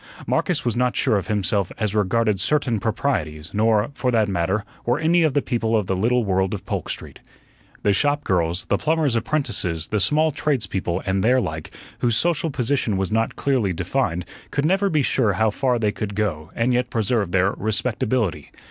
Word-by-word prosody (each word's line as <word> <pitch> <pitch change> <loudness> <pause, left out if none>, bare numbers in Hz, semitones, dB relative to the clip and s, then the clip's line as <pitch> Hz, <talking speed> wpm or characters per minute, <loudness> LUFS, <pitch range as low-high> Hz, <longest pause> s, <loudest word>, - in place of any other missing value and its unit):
Marcus 180 -8 0
was 120 - 0
not 125 0 +1
sure 130 -5 +2
of 100 - -1
himself 100 -2 0
as 105 -2 -1
regarded 105 0 +1
certain 120 +1 +1
proprieties, 85 - -2
nor, 110 +3 +2
for 125 -1 -1
that 110 -3 +2
matter, 95 +2 -1 0.2
were 120 +2 +1
any 165 +3 +3
of 155 -4 +2
the 145 - +2
people 115 -3 0
of 105 - 0
the 95 - -1
little 120 +6 +2
world 95 0 +1
of 95 - -9
Polk - - -3
Street. - - -6 0.6
The 100 - +3
shop 145 +7 +2
girls, 90 0 0
the - - 0
plumbers' 155 -5 +1
apprentices, 115 - 0
the 105 - 0
small 150 +11 +3
tradespeople, 110 - -1
and 95 -1 0
their 125 +3 +4
like, 80 -9 -4 0.3
whose 120 -2 +2
social 170 -1 +1
position 125 -5 0
was 95 +1 -1
not 115 +1 0
clearly 125 -9 0
defined, 90 0 -1 0.2
could 140 - -1
never 195 +4 +2
be 155 -4 +2
sure 105 -4 +2
how 110 +3 +2
far 125 +2 0
they 105 -3 +1
could 100 -1 -5
go 85 -8 -2
and 120 +2 +1
yet 125 0 0
preserve 110 -4 0
their 95 +1 +3
"respectability." 110 - -1
110 Hz, 190 wpm, -22 LUFS, 95-130 Hz, 0.6 s, their